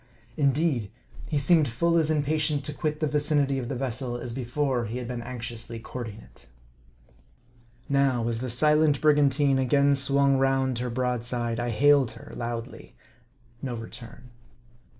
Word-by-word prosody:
Indeed, 140 -6 +1 0.4
he 150 - 0
seemed 150 +2 +4
full 170 +9 +1
as 160 -1 +1
impatient 150 -1 0
to 150 - -4
quit 150 0 -3
the - - +2
vicinity 145 -2 +1
of 120 -2 -5
the 135 - -3
vessel, 125 -1 -3
as 120 -1 -6
before 130 0 -1
he 115 +3 -4
had 125 -1 -5
been 120 -1 -4
anxiously 120 -1 -6
courting 115 -1 -7
it. - - -20 1.4
Now, 135 -4 +1
as 115 -1 -2
the 130 +1 -4
silent 150 +3 +3
brigantine 145 -2 +3
again 140 +2 +3
swung 140 0 +3
round 135 -2 +1
her 125 0 -2
broadside, 120 -1 -2
I 120 0 -1
hailed 135 +1 +4
her 115 - -12
loudly. 120 +1 -6 0.7
No 125 -3 -3
return. 115 +2 -10
130 Hz, 150 wpm, -26 LUFS, 120-145 Hz, 1.4 s, seemed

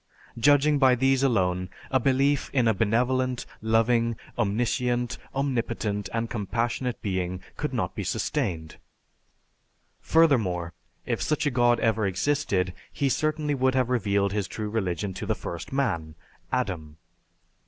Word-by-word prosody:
Judging 145 +3 +4
by 130 -2 +5
these 135 +1 +2
alone, 90 -8 +1 0.2
a 130 - +4
belief 135 +2 +2
in 125 -4 +3
a 110 - +4
benevolent, 125 +4 +1 0.2
loving, 115 +1 +2 0.2
omniscient, 120 +2 0 0.2
omnipotent, 115 -7 -1
and 115 0 -1
compassionate 120 +2 -2
Being 95 -3 -2 0.2
could - - -3
not - - -2
be - - -4
sustained. 80 -3 -2 1.2
Furthermore, 105 - +2 0.3
if - - -2
such 150 -1 0
a 145 - +2
God 120 -1 +3
ever 110 -2 +2
existed, 95 -3 0 0.2
he 140 -2 0
certainly 155 +1 0
would 130 -1 +1
have 125 -1 +1
revealed 100 -4 +1
his 100 -2 -1
true 105 -1 -5
religion 95 -3 -2
to - - -6
the - - +1
first 85 -2 -7
man, 85 - -1 0.4
Adam. 90 -12 -2
115 Hz, 130 wpm, -26 LUFS, 100-130 Hz, 1.2 s, by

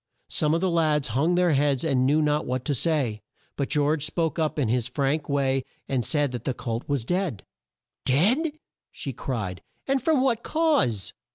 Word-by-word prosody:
Some 150 +1 +2
of 165 - 0
the 190 - +2
lads 155 -5 +2
hung 150 +10 +2
their 180 -1 +3
heads 140 -2 +2
and 130 -5 +2
knew 155 +3 +3
not 150 0 +1
what 130 0 -2
to 145 - +1
say; 130 -7 0 0.3
but 140 - -2
George 150 0 +1
spoke 160 +1 -1
up 155 -1 0
in 140 -5 +1
his 120 +1 0
frank 140 +3 -1
way 135 -2 +1 0.2
and 130 -3 0
said 145 +3 0
that 120 -2 -5
the 130 - -2
colt 115 +1 -4
was 140 -5 0
dead. 175 - -1 0.6
"Dead!" 235 - +2 0.6
cried 105 -9 -4
she; - - -45
"and 275 -1 +2
from 295 0 +2
what 240 -4 +2
cause?" 145 - +1
145 Hz, 185 wpm, -26 LUFS, 130-165 Hz, 0.6 s, their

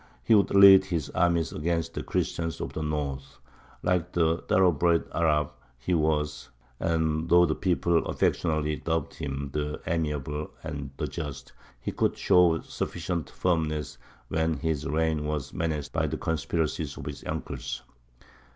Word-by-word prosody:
He 65 - +4
would 100 -2 +5
lead 100 -1 +8
his 85 -5 -2
armies 85 -2 +2
against 80 +1 -1
the - - -3
Christians 80 -1 -2
of - - -5
the - - -4
North, 75 -3 -3 0.5
like 90 -1 0
the 80 -1 +2
thoroughbred 85 -2 +3
Arab 75 -3 +2 0.3
he 70 +9 -2
was; 75 -3 0 0.3
and, 80 -1 0
though 90 0 +7
the 80 - +1
people 85 -2 +1
affectionately 75 -2 0
dubbed 80 +1 -2
him 70 -2 -4
"The 75 0 -2
Amiable" 75 -2 -2
and 75 -4 -5
"The - - -1
Just," 75 -5 -6 0.3
he - - -4
could - - 0
show 85 -3 +4
sufficient 85 -2 -4
firmness 75 -5 -1 0.3
when 80 0 0
his 80 -3 -2
reign 80 0 0
was 75 -3 -3
menaced 75 -3 -2
by - - +1
the - - -3
conspiracies 80 0 -2
of - - -7
his 70 -1 -6
uncles. - - -4
80 Hz, 145 wpm, -27 LUFS, 75-85 Hz, 0.5 s, lead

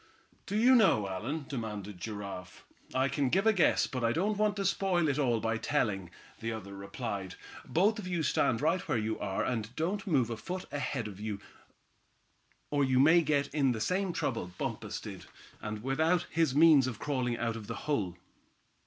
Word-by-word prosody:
"Do 205 - -3
you 245 +4 +6
know, 190 - +5
Allan?" 125 +11 -4
demanded 105 -7 -5
Giraffe. 100 -3 -7 0.3
"I 130 +1 +3
can 140 -1 0
give 195 +9 +2
a 220 - +5
guess, 180 -5 +3
but 125 -2 -4
I 115 - +3
don't 205 +6 +1
want 210 0 +1
to 200 -1 -2
spoil 180 -3 +2
it 145 0 0
all 120 -5 +2
by 115 +1 0
telling," 105 - -1 0.3
the 115 0 -3
other 100 -3 -6
replied. 100 -1 -5 0.3
"Both 210 +6 +2
of 190 - -6
you 175 -3 -1
stand 115 -5 +2
right 165 +5 +2
where 150 - +1
you 110 0 -2
are, 95 -2 -1
and 115 0 -3
don't 195 +7 -2
move 130 -9 +2
a 115 - -3
foot 180 +11 -5
ahead, 140 -5 -2 1.6
or 145 -1 +2
you 130 -1 +3
may 160 +5 +7
get 145 -3 0
in 140 -4 +3
the 110 - -4
same 185 - 0
trouble 115 - -2
Bumpus - - -4
did, - - -9 0.3
and 105 0 -5
without 160 +6 +2
his 160 -5 +2
means 150 -4 +7
of 120 -4 -4
crawling 125 -4 -1
out 115 -1 -1
of 110 -3 -8
the - - -4
hole." 100 - -1
135 Hz, 185 wpm, -31 LUFS, 110-165 Hz, 1.6 s, may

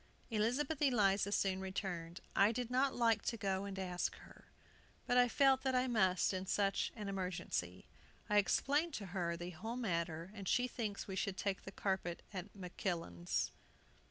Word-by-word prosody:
Elizabeth 255 +8 +1
Eliza 205 -7 +3
soon 190 -2 +1
returned. 185 -3 -4
"I 200 +2 +6
did 245 +1 -3
not 265 +2 +2
like 230 -3 +3
to 230 - -1
go 195 -1 -1
and 195 -1 -5
ask 180 -2 -1
her. - - -15 0.6
But 245 - +4
I 245 - +6
felt 270 +1 +4
that 265 -1 +1
I 250 0 +3
must 190 -7 +3
in 190 0 -3
such 195 0 +1
an 210 -3 -5
emergency. 180 - -3 0.4
I 210 - +3
explained 290 +9 +2
to 205 - -4
her 170 -3 -1
the 175 +1 -5
whole 225 +8 -5
matter, 170 -5 -2
and 200 -3 -7
she 250 +6 +3
thinks 215 -5 -4
we 190 - -4
should 195 0 -1
take 195 -1 -2
the 195 - -6
carpet 190 -3 -2
at 190 +1 -5
Makillan's." 175 - -2
195 Hz, 170 wpm, -37 LUFS, 185-235 Hz, 0.6 s, I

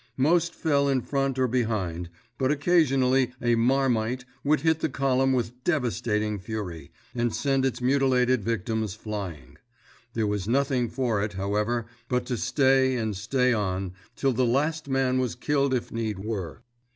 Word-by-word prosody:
Most 160 +6 +2
fell 140 -3 +1
in 135 -2 +2
front 135 0 -1
or 130 -1 +2
behind, 105 -9 -1 0.3
but 130 -1 +2
occasionally 135 -5 +3
a 120 -1 +2
"marmite" 125 0 +1 0.2
would 150 +2 +2
hit 160 -1 +2
the - - 0
column 135 -1 +1
with 125 -1 -2
devastating 110 - 0
fury, 95 -5 -6 0.2
and 120 -1 0
send 135 -2 +1
its 130 - -4
mutilated 130 -2 +2
victims 110 -1 -2
flying. 90 - -6 0.6
There 110 -2 +1
was 105 -2 -2
nothing 130 -1 +1
for 120 -6 0
it, 105 0 -3
however, 105 +4 -1 0.2
but 125 -1 0
to 125 - -2
stay 130 +1 +3
and 110 -4 -2
stay 125 +6 +1
on, 95 -3 -2 0.2
till 135 -2 +1
the 130 +2 +1
last 145 +5 0
man 130 -1 +1
was 125 -3 -1
killed 140 -2 +1
if 125 -2 -1
need 110 -3 -2
were. 95 -8 -5
125 Hz, 155 wpm, -26 LUFS, 110-135 Hz, 0.6 s, occasionally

